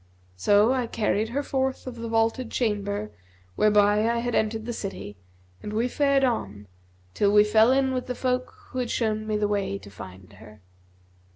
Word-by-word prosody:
So 205 - +4
I 250 -3 -1
carried 220 -1 -1
her 280 +4 -2
forth 265 -1 -2
of 250 -2 -7
the 230 0 -5
vaulted 225 +2 0
chamber 210 -2 -2 0.4
whereby 210 +1 +3
I 235 - 0
had 240 +1 -2
entered 220 0 0
the 240 - -4
city 195 - -6 0.5
and 210 - -6
we 230 +3 +1
fared 275 +1 +2
on, 105 - -2 0.5
till 200 -1 +2
we 210 0 +6
fell 220 +3 +4
in 265 0 +2
with 255 -1 -3
the 250 - -3
folk 255 0 -1 0.2
who 255 - -4
had 245 -2 -2
shown 215 -2 -1
me 215 -1 0
the 210 0 +1
way 200 - -1
to 100 0 -13
find 95 0 -12
her." 105 -2 -15
220 Hz, 185 wpm, -25 LUFS, 205-250 Hz, 0.5 s, we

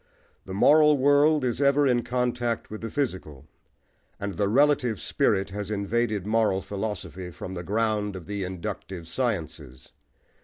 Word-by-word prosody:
The 95 - -7
moral 150 +6 +5
world 145 +1 +4
is 120 +2 -1
ever 140 +1 +4
in 125 -3 +3
contact 120 -2 -2
with 110 - -7
the 115 - -4
physical, 95 - -4 0.7
and 100 0 -4
the 100 +3 0
relative 125 -4 +3
spirit 95 0 0
has 105 0 -5
invaded 105 0 -1
moral 105 -3 +1
philosophy 95 -2 -5
from 90 +2 -8
the 90 - -5
ground 105 +1 -1
of 90 -3 -8
the 100 -1 -4
inductive 90 -1 -6
sciences. 80 - -4
105 Hz, 145 wpm, -26 LUFS, 95-125 Hz, 0.7 s, moral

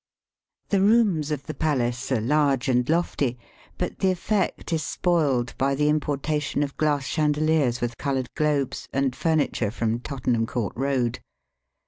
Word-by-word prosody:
The 200 -2 +2
rooms 200 -8 +3
of 145 -2 -3
the 155 - -5
palace 130 -4 -1
are 130 - +2
large 140 +2 +2
and 125 0 +2
lofty, 150 -6 0 0.4
but - - -3
the 190 - +3
effect 185 -1 -1
is 160 - +1
spoiled 145 -10 +1
by 135 +1 +2
the 150 +2 +2
importa 150 0 0
tion 145 0 -1
of 140 -1 -5
glass 145 -3 0
chandeHers 150 -4 +1
with 120 -1 -3
coloured 135 -3 -2
globes 150 -3 -1
and 135 -2 0
furniture 155 -9 +1
from 115 +1 -1
Tottenham 125 -4 -1
Court 110 -5 -2
Eoad. 125 -2 0
140 Hz, 150 wpm, -25 LUFS, 125-155 Hz, 0.4 s, rooms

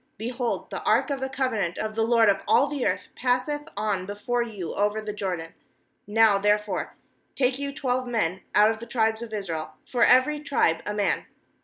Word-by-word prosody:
Be 225 +3 -4
hold, 245 -1 -3
the - - -4
ark - - +2
of 275 - -1
the 265 0 -3
covenant 240 -10 -1
of 215 0 -3
the 225 - -1
Lord 230 0 +4
of 195 -1 +3
all 275 - +5
the 285 -2 -1
earth - - -2
passeth 255 +4 -1
on 205 -3 -1
before 240 +4 -2
you 205 -8 -5
over 205 +2 0
the 215 -1 -5
Jordan. 180 -5 -4 0.6
^Now 210 -2 +4
there 210 +1 +4
fore 210 -3 -5 0.4
take 255 0 +1
you 280 0 -3
twelve 255 -3 -1
men 190 -7 -1
put 210 +1 +5
of 220 - -5
the 235 - -9
tribes 225 -2 +1
of 235 -2 -7
Israel, 170 -7 -4
for 245 - -3
every 275 +4 +5
tribe 270 - +1
a 210 - -1
man. 205 -1 0
225 Hz, 200 wpm, -26 LUFS, 205-255 Hz, 0.6 s, all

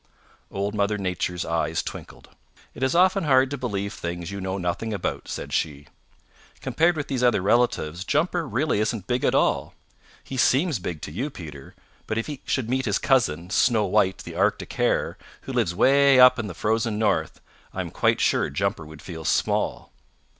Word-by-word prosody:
Old 100 +1 -3
Mother 105 0 0
Nature's 90 -2 -2
eyes 85 0 -1
twinkled. - - -9 0.4
"It - - -11
is 130 +2 +1
often 185 0 +4
hard 130 -2 +4
to - - -1
believe 100 -5 -3
things 85 -1 -5
you 100 0 -5
know 95 +1 -3
nothing 95 +5 -2
about," 95 - -4
said - - -6
she. 75 -2 -2 0.7
"Compared 165 +1 +1
with 145 - -3
these 130 -3 -2
other 125 -4 +3
relatives, 95 -7 +1
Jumper 165 - 0
really 130 +1 0
isn't 110 -2 -1
big 125 +2 -1
at - - +2
all. - - +1 0.5
He 130 - -7
seems 135 - +2
big 85 -4 -5
to - - -6
you, 125 - -3
Peter, 75 - -10 0.3
but 110 - -2
if 115 - -1
he 145 -3 -7
should 130 -5 -1
meet 130 +2 0
his 105 -2 +1
cousin, 90 - +1
Snow 115 -4 +3
White 95 0 +2
the - - -8
Arctic - - 0
Hare, - - 0 0.2
who 135 - -7
lives 110 -9 0
way 140 +3 +5
up 125 0 +7
in 115 - -3
the 90 - -7
Frozen 110 +2 0
North, 105 -2 0 0.3
I - - -3
am - - -6
quite - - +1
sure - - +2
Jumper 100 +1 -2
would 80 0 -12
feel 80 -3 -7
small. - - 0
110 Hz, 185 wpm, -24 LUFS, 90-130 Hz, 0.7 s, up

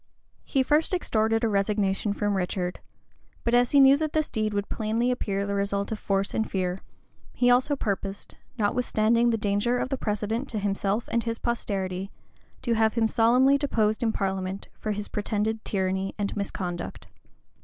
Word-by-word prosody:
He 270 -2 +1
first 305 +6 +2
extorted 225 -8 +1
a - - +4
resignation 200 0 0
from 205 0 0
Richard;[*] 180 -1 -2 0.6
but 235 - 0
as 245 0 +4
he 285 - +5
knew 270 0 +8
that 310 0 -2
this 310 -1 +1
deed 215 -1 -1
would 205 -1 -2
plainly 225 +3 0
appear 200 -5 -1
the 200 - -2
result 200 +1 -1
of 220 - -3
force 195 0 -1
and 220 - -1
fear, 185 -1 -1 0.5
he 245 0 +3
also 255 +4 +3
purposed, 200 -5 -4 0.2
notwithstanding 230 +1 +2
the 230 - +1
danger 210 +4 +1
of 250 - -2
the 270 - -1
precedent 220 +5 -2
to 220 - -4
himself 200 +2 -1
and 235 0 +1
his 230 -1 -2
posterity, 195 -6 -2 0.5
to 235 - +1
have 220 -1 +2
him 225 -2 +3
solemnly 250 +5 +4
deposed 220 -7 +1
in 230 -2 +2
parliament 190 -1 -3
for 215 - -2
his 210 0 -3
pretended 215 +1 -2
tyranny 190 0 -1
and 205 -1 -2
misconduct. 180 -3 -4
215 Hz, 170 wpm, -26 LUFS, 200-235 Hz, 0.6 s, knew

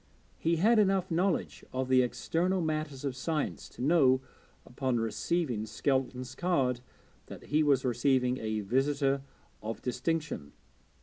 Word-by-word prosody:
He 165 +1 +2
had 215 +7 +4
enough 190 -3 +2
knowledge 180 +2 0
of 130 0 -2
the 130 0 +5
external 175 +9 0
matters 155 -4 -2
of 135 -3 -2
science 150 +2 -2
to - - -7
know, 135 -4 +5 0.5
upon 125 -1 -1
receiving 115 +1 -1
Skelton's 130 +2 -1
card, 135 -9 0 0.5
that - - -10
he 150 +2 +1
was 140 -3 +3
receiving 125 +1 +2
a 110 -1 -2
visitor 135 +5 +1 0.4
of 110 +1 -5
distinction. 150 - -2
135 Hz, 130 wpm, -30 LUFS, 125-165 Hz, 0.5 s, the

